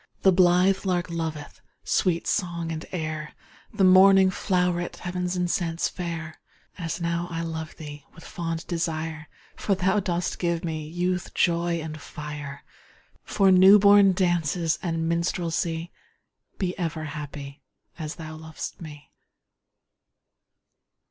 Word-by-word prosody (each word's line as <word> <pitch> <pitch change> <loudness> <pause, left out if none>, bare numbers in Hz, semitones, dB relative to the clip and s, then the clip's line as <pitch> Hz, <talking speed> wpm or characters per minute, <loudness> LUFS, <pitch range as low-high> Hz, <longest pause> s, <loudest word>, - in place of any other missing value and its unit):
The 190 - +7
blithe 185 +1 +4
lark 180 -2 -1
loveth 160 -3 -5 0.2
Sweet 175 -3 +1
song 170 -4 -1
and 160 0 -5
air, 155 -3 -4 0.4
The 205 -3 0
morning 190 0 +7
flow'ret 180 -2 0
Heav'n's 180 0 -3
incense 175 -2 0
fair, 165 -3 -6 0.4
As 165 0 -3
I - - -5
now 170 +1 -1
love 160 -1 -5
thee 145 -2 -9
With 165 - -13
fond 165 -1 -4
desire, 160 -2 -3 0.3
For 200 - 0
thou 190 +2 +2
dost 180 -2 -2
give 170 -1 -1
me 155 -2 -4
Youth, 180 +2 -2
joy, 170 0 +1
and 155 -1 -7
fire, 150 -2 -7 0.6
For 195 -2 +3
new 190 +2 +8
born 200 -1 +6
dances 175 -2 +1
And 165 -2 -1
minstrelsy. 170 0 -1 0.7
Be 180 -2 -2
ever 165 -2 -2
happy, 145 -2 -7 0.4
As 155 -1 -5
thou 155 -2 -8
lov'st 160 +2 -7
me! 150 -3 -11
170 Hz, 125 wpm, -25 LUFS, 160-180 Hz, 0.7 s, new